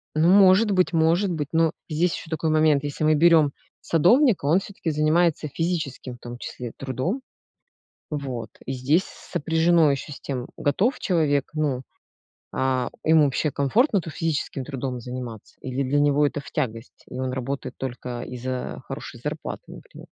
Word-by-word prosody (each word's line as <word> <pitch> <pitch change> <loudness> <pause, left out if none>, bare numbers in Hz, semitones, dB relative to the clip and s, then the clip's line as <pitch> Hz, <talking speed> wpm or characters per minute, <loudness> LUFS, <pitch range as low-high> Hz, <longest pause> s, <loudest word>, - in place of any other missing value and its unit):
Ну, 155 +2 +3
может 195 +2 +6
быть, 185 -2 +2
может 170 +4 +3
быть, 150 -4 -2
но 165 -1 +3 0.2
здесь 165 +3 +1
еще - - -9
такой 160 0 -1
момент: 155 -2 +3
если 145 +1 -3
мы 155 0 +5
берем 160 -2 +5 0.3
садовника, 210 - +4
он 160 +6 +4
всё-таки 195 -4 -5
занимается 155 +1 +2
физическим, 155 -5 -3
в - - -19
том 120 0 -8
числе, 120 -1 -6
трудом. 135 - -2 0.9
Вот. 135 -6 -4
И 135 - -4
здесь 140 +8 +2
с - - -15
сопряжено 165 0 +3
еще 140 +2 -3
с - - -9
тем, 130 -2 -4
готов 195 - +1
человек, 150 -7 +1
ну 145 -5 0 0.7
а 130 -1 0
ему 155 -1 +5
вообще 140 +2 0
комфортно-то 180 - +2
физическим 150 -4 -2
трудом 130 -2 -4
заниматься 125 -3 -8
или 130 +1 -2
для 135 +2 +1
него 145 0 +4
это 145 - -3
в - - -12
тягость 115 -6 -4
и 125 - -7
он 130 -1 -2
работает 130 +2 -4
только 125 -2 -5
из-за 125 +1 -5
хорошей - - -7
зарплаты, - - -5
например. - - -13
150 Hz, 160 wpm, -24 LUFS, 130-165 Hz, 0.9 s, может